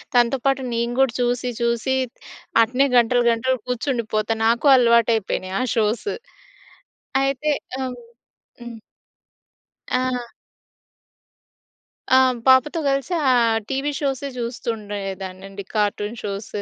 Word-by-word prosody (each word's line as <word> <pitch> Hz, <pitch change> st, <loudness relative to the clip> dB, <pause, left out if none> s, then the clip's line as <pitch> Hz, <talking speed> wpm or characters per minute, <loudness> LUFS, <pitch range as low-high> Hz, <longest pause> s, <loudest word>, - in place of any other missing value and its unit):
తనతో 245 Hz, +2 st, +4 dB
పాటు 270 Hz, -1 st, +2 dB
నేను 235 Hz, +1 st, -1 dB
కూడా 270 Hz, -3 st, +3 dB
చూసి 245 Hz, +1 st, 0 dB
చూసి 235 Hz, +3 st, 0 dB, 0.7 s
అట్నే 250 Hz, +4 st, +2 dB
గంటలు 240 Hz, +1 st, +3 dB
గంటలు 260 Hz, +3 st, 0 dB
కూర్చుండిపోతాను 225 Hz, -3 st, -1 dB
నాకు 235 Hz, +5 st, +2 dB
అలవాటు 235 Hz, -2 st, +4 dB
అయిపోయినాయి 190 Hz, -3 st, -3 dB
ఆ -, -, +1 dB
షోస్. 220 Hz, -, 0 dB, 1.2 s
అయితే 275 Hz, +2 st, 0 dB, 0.3 s
హ్మ్. 255 Hz, -2 st, -4 dB, 0.6 s
హ్మ్. 240 Hz, -1 st, -9 dB, 1.1 s
ఆ! 250 Hz, -2 st, -1 dB, 1.8 s
ఆ! -, -, +8 dB, 0.3 s
పాపతో 260 Hz, +5 st, +5 dB
గలిసి 275 Hz, +4 st, -1 dB, 0.2 s
ఆహ్, 230 Hz, -2 st, +3 dB
టీవీ 275 Hz, +2 st, -1 dB
షోసె 280 Hz, -1 st, -2 dB
చూస్తుండేదాన్నండి. 200 Hz, -4 st, -5 dB
Cartoon 210 Hz, +1 st, -1 dB
shows 200 Hz, 0 st, -5 dB
235 Hz, 100 wpm, -22 LUFS, 220-260 Hz, 1.8 s, ఆ